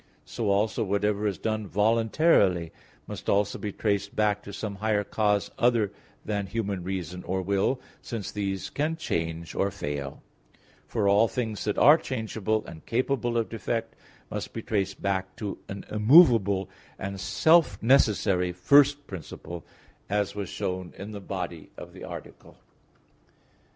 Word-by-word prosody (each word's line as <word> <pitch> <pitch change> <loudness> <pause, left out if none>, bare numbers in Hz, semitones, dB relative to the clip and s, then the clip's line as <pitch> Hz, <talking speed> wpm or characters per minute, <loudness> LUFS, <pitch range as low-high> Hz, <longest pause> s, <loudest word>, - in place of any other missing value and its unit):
So 110 -3 -2
also 105 +3 +1
whatever 105 +1 0
is 100 -4 -2
done 110 -2 -2
voluntarily 105 - +3 0.3
must - - -6
also 100 0 +1
be 105 - -3
traced 100 -1 -1
back 105 -1 +2
to 100 - -9
some 100 0 -5
higher 105 0 +1
cause 105 -1 0
other 115 -4 +3 0.3
than 100 -2 -2
human 100 -4 -3
reason 90 -1 -4
or 95 +1 -2
will, 100 +7 +1 0.2
since 115 -5 -5
these 100 -2 -3
can 155 +3 -1
change 85 - -3
or 100 - +1
fail; 75 -7 -5 0.6
for 105 -2 0
all 100 +3 +5
things 110 -3 -3
that 105 - -1
are 150 +3 +7
changeable 110 -5 -2
and 80 -1 -10
capable 120 -1 0
of 115 - +1
defect 115 0 -3 0.4
must - - -5
be 115 - -5
traced 95 -3 -2
back 95 -1 -1
to 105 -4 -5
an 100 0 -6
immovable 105 - +6 0.3
and 100 0 -5
self 165 - +4
necessary 105 -7 +3
first 140 +10 +4
principle, 85 - -8 0.5
as 105 -1 0
was 100 -3 -4
shown 90 -1 -4
in 100 +2 -7
the 100 -1 -7
body 90 -5 -5
of - - -10
the - - -11
Article. - - -10
105 Hz, 145 wpm, -27 LUFS, 95-115 Hz, 0.6 s, are